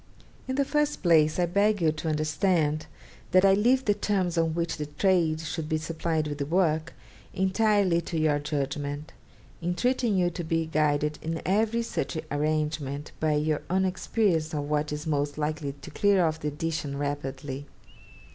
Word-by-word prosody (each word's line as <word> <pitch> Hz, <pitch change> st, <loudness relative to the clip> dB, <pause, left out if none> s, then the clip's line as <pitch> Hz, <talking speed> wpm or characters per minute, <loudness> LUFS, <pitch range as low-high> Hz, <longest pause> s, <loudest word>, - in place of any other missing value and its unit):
'In 260 Hz, -, -2 dB
the 280 Hz, 0 st, +2 dB
first 295 Hz, -2 st, 0 dB
place, 155 Hz, -3 st, +4 dB
I 180 Hz, -, +3 dB
beg 200 Hz, +4 st, +2 dB
you 160 Hz, -3 st, +3 dB
to 160 Hz, +1 st, -4 dB
understand 155 Hz, 0 st, +1 dB, 0.5 s
that 185 Hz, +1 st, +6 dB
I 195 Hz, -, +6 dB
leave 250 Hz, +6 st, +3 dB
the 205 Hz, -, +4 dB
terms 190 Hz, -4 st, 0 dB
on 165 Hz, -1 st, +1 dB
which 170 Hz, 0 st, -1 dB
the 150 Hz, -1 st, -4 dB
trade 160 Hz, 0 st, +2 dB
should 160 Hz, -1 st, -4 dB
be 160 Hz, -, +1 dB
supplied 160 Hz, 0 st, -2 dB
with 145 Hz, 0 st, -5 dB
the 140 Hz, -, -1 dB
work 160 Hz, -2 st, +1 dB, 0.4 s
entirely 190 Hz, -2 st, +2 dB
to 165 Hz, 0 st, -4 dB
your 155 Hz, -2 st, +2 dB
judgment, 145 Hz, 0 st, -3 dB, 0.5 s
entreating 220 Hz, +5 st, +1 dB
you 175 Hz, -1 st, +2 dB
to 175 Hz, -, -5 dB
be 165 Hz, 0 st, 0 dB
guided 150 Hz, -1 st, +1 dB
in 165 Hz, 0 st, -3 dB
every 220 Hz, +4 st, +1 dB
such 225 Hz, -, -3 dB
arrangement 150 Hz, -1 st, -1 dB
by 155 Hz, -1 st, +2 dB
your 150 Hz, 0 st, 0 dB
own 190 Hz, +1 st, +2 dB
experience 185 Hz, -4 st, 0 dB
of 145 Hz, -, -1 dB
what 150 Hz, 0 st, 0 dB
is 150 Hz, +1 st, -4 dB
most 145 Hz, -2 st, -1 dB
likely 150 Hz, -2 st, -2 dB
to 140 Hz, -2 st, -12 dB
clear 200 Hz, -3 st, +3 dB
off 160 Hz, 0 st, -1 dB
the 150 Hz, -, -3 dB
edition 150 Hz, -1 st, -3 dB
rapidly. 140 Hz, -1 st, -4 dB
160 Hz, 170 wpm, -27 LUFS, 150-185 Hz, 0.5 s, that